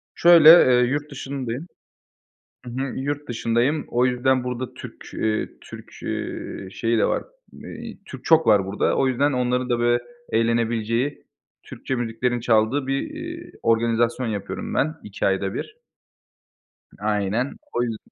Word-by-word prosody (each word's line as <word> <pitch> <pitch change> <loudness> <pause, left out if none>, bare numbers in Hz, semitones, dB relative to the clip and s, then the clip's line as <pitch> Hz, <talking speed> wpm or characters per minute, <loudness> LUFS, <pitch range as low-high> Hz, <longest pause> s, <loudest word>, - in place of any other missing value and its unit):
Şöyle, 170 -2 +8
eee, 125 -7 +7
yurt 145 +2 -3
dışındayım 135 0 -5 1.0
Hı - - -7
hı. 135 +2 -3
Yurt 145 +2 -3
dışındayım, 120 +6 0
o 120 +1 +2
yüzden 130 +1 +1
burada 125 0 -4
Türk, - - -11
eee, 110 -1 -1
Türk, - - -12
eee, 95 - -5
şeyi 115 +3 0
de - - +3
var, - - 0 0.3
eee, 230 -1 -9
Türk 130 -7 -10
çok 160 -1 +4
var 105 -3 +5
burada. 100 +2 0
O 135 - +3
yüzden, 140 +3 +1
onların 125 0 0
da 120 -1 +1
böyle 120 0 +2 0.3
eğlenebileceği, 115 +3 0 0.4
Türkçe 130 - -5
müziklerin 120 +1 -1
çaldığı 115 +4 +2
bir, 135 0 0
iii, 335 +2 -7
organizasyon 115 +2 +1
yapıyorum 100 -3 -4
ben, 155 +2 0
iki 100 -1 -4
ayda 95 0 0
bir. 435 - -6 1.2
Aynen. 105 +4 -1 0.2
O 120 - +1
yüz 115 -2 -3
125 Hz, 140 wpm, -23 LUFS, 115-140 Hz, 1.2 s, Şöyle